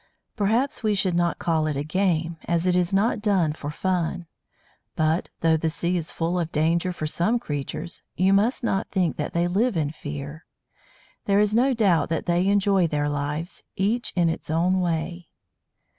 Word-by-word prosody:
Perhaps 230 Hz, +7 st, +1 dB
we 215 Hz, -2 st, +1 dB
should 185 Hz, -2 st, +1 dB
not 175 Hz, 0 st, +1 dB
call 160 Hz, -2 st, 0 dB
it 150 Hz, -2 st, -2 dB
a 140 Hz, -, -1 dB
"game," 165 Hz, 0 st, 0 dB
as 170 Hz, 0 st, 0 dB
it 180 Hz, -1 st, +3 dB
is 180 Hz, 0 st, +1 dB
not 205 Hz, +2 st, +1 dB
done 190 Hz, -8 st, +2 dB
for 145 Hz, -1 st, -6 dB
fun. 175 Hz, +1 st, -1 dB, 0.7 s
But, 160 Hz, +2 st, +1 dB
though 160 Hz, -1 st, +4 dB
the 160 Hz, +1 st, 0 dB
sea 170 Hz, +2 st, -1 dB
is 165 Hz, -2 st, -2 dB
full 170 Hz, +2 st, -1 dB
of 165 Hz, -1 st, -2 dB
danger 165 Hz, +4 st, +1 dB
for 165 Hz, -3 st, -5 dB
some 175 Hz, +9 st, +1 dB
creatures, 155 Hz, -, -5 dB, 0.2 s
you 190 Hz, +2 st, +4 dB
must 220 Hz, +7 st, +2 dB
not 195 Hz, -4 st, 0 dB
think 180 Hz, -5 st, 0 dB
that -, -, -3 dB
they 170 Hz, +1 st, +1 dB
live 205 Hz, +3 st, +1 dB
in 150 Hz, -2 st, 0 dB
fear. 150 Hz, 0 st, -7 dB, 0.8 s
There 200 Hz, 0 st, +3 dB
is 210 Hz, 0 st, +2 dB
no 255 Hz, +3 st, +3 dB
doubt 185 Hz, -10 st, +2 dB
that 165 Hz, -, -2 dB
they 175 Hz, +2 st, +1 dB
enjoy 200 Hz, -3 st, +3 dB
their 145 Hz, -1 st, -1 dB
lives, 145 Hz, +4 st, -3 dB
each 220 Hz, +6 st, 0 dB
in 175 Hz, -2 st, +3 dB
its 165 Hz, -, -3 dB
own 175 Hz, +4 st, +2 dB
way. 170 Hz, 0 st, -2 dB
175 Hz, 185 wpm, -24 LUFS, 160-195 Hz, 0.8 s, though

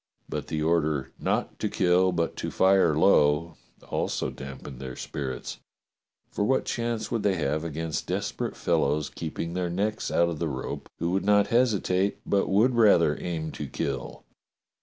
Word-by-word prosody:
But -, -, -4 dB
the 75 Hz, -1 st, -2 dB
order 75 Hz, -5 st, +1 dB
"Not -, -, -1 dB
to -, -, -1 dB
kill, 90 Hz, +1 st, +3 dB
but 85 Hz, -2 st, -1 dB
to -, -, -3 dB
fire 95 Hz, -5 st, +4 dB
low," 80 Hz, -1 st, +4 dB, 0.3 s
also -, -, -1 dB
damped 65 Hz, -1 st, -9 dB
their 65 Hz, -1 st, -6 dB
spirits, 65 Hz, -3 st, -5 dB, 0.7 s
for -, -, -1 dB
what 130 Hz, +5 st, +2 dB
chance 115 Hz, -2 st, -2 dB
would 115 Hz, -, 0 dB
they 100 Hz, -2 st, +2 dB
have 75 Hz, -1 st, -1 dB
against 80 Hz, 0 st, -3 dB
desperate -, -, -2 dB
fellows 75 Hz, +2 st, 0 dB
keeping 85 Hz, +1 st, -5 dB
their 90 Hz, -1 st, -1 dB
necks 105 Hz, +5 st, -1 dB
out 85 Hz, -, +3 dB
of 80 Hz, -3 st, -4 dB
the 85 Hz, -, -1 dB
rope, 65 Hz, -2 st, -5 dB
who 85 Hz, -, -1 dB
would 95 Hz, +1 st, 0 dB
not 105 Hz, 0 st, +4 dB
hesitate 100 Hz, -5 st, +2 dB
but 100 Hz, -1 st, +1 dB
would 110 Hz, +7 st, +4 dB
rather 100 Hz, -10 st, +5 dB
aim 80 Hz, -3 st, -3 dB
to 75 Hz, -, -6 dB
kill 70 Hz, -1 st, -4 dB
85 Hz, 160 wpm, -27 LUFS, 75-100 Hz, 0.7 s, rather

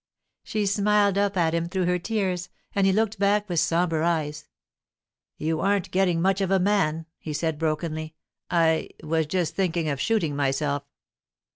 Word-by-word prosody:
She 215 Hz, -1 st, -1 dB
smiled 200 Hz, 0 st, +2 dB
up 200 Hz, -1 st, +1 dB
at 165 Hz, -2 st, +2 dB
him 170 Hz, 0 st, -1 dB
through 185 Hz, 0 st, 0 dB
her 180 Hz, 0 st, +1 dB
tears, 185 Hz, -3 st, -2 dB, 0.2 s
and 195 Hz, -1 st, +3 dB
he -, -, +4 dB
looked 215 Hz, 0 st, 0 dB
back 205 Hz, +1 st, +2 dB
with 175 Hz, -4 st, 0 dB
sombre 165 Hz, -1 st, +1 dB
eyes. 155 Hz, -3 st, -1 dB, 0.9 s
'You 160 Hz, 0 st, -1 dB
aren't 200 Hz, +1 st, 0 dB
getting 180 Hz, -3 st, +2 dB
much 190 Hz, +2 st, +2 dB
of 190 Hz, -, 0 dB
a 195 Hz, -, +4 dB
man,' 180 Hz, -5 st, +1 dB
he 155 Hz, -, -5 dB
said 160 Hz, 0 st, -1 dB
brokenly. 155 Hz, 0 st, -2 dB, 0.3 s
'I—was 160 Hz, -1 st, +1 dB
just 170 Hz, -1 st, -1 dB
thinking 170 Hz, -4 st, 0 dB
of 140 Hz, -2 st, -2 dB
shooting 185 Hz, -11 st, +1 dB
myself. 140 Hz, 0 st, 0 dB
175 Hz, 160 wpm, -25 LUFS, 160-195 Hz, 0.9 s, he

